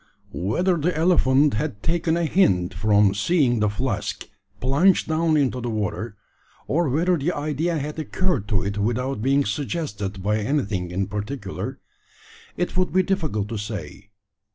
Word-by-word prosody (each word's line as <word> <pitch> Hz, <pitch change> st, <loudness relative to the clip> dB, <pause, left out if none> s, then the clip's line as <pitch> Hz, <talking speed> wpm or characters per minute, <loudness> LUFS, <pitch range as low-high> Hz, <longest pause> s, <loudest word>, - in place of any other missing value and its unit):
Whether 170 Hz, -, +1 dB
the 160 Hz, +1 st, 0 dB
elephant 150 Hz, -4 st, +4 dB
had 110 Hz, -2 st, -3 dB
taken 165 Hz, 0 st, +1 dB
a 170 Hz, -, +1 dB
hint 95 Hz, -, +2 dB
from 105 Hz, 0 st, +3 dB
seeing 120 Hz, -, +2 dB
the 105 Hz, 0 st, +2 dB
flask 105 Hz, 0 st, -3 dB, 0.3 s
plunged 145 Hz, +9 st, +3 dB
down 160 Hz, 0 st, +2 dB
into 130 Hz, -3 st, +1 dB
the 120 Hz, -, -3 dB
water, 105 Hz, 0 st, -3 dB, 0.5 s
or 160 Hz, +1 st, +1 dB
whether 170 Hz, +6 st, +2 dB
the 155 Hz, +4 st, 0 dB
idea 155 Hz, +3 st, -1 dB
had 150 Hz, +2 st, -4 dB
occurred 155 Hz, -, -1 dB
to 100 Hz, -5 st, +1 dB
it 100 Hz, +1 st, -3 dB
without 120 Hz, +3 st, -1 dB
being 140 Hz, +3 st, +2 dB
suggested 105 Hz, -, -3 dB
by 105 Hz, +2 st, +1 dB
anything 105 Hz, -7 st, -1 dB
in 95 Hz, +2 st, -1 dB
particular, 105 Hz, +1 st, -5 dB, 0.8 s
it 175 Hz, -, -2 dB
would 185 Hz, 0 st, +1 dB
be 185 Hz, 0 st, +3 dB
difficult 155 Hz, -, -1 dB
to 115 Hz, -, -3 dB
say. 100 Hz, -1 st, -6 dB
130 Hz, 155 wpm, -23 LUFS, 105-160 Hz, 0.8 s, elephant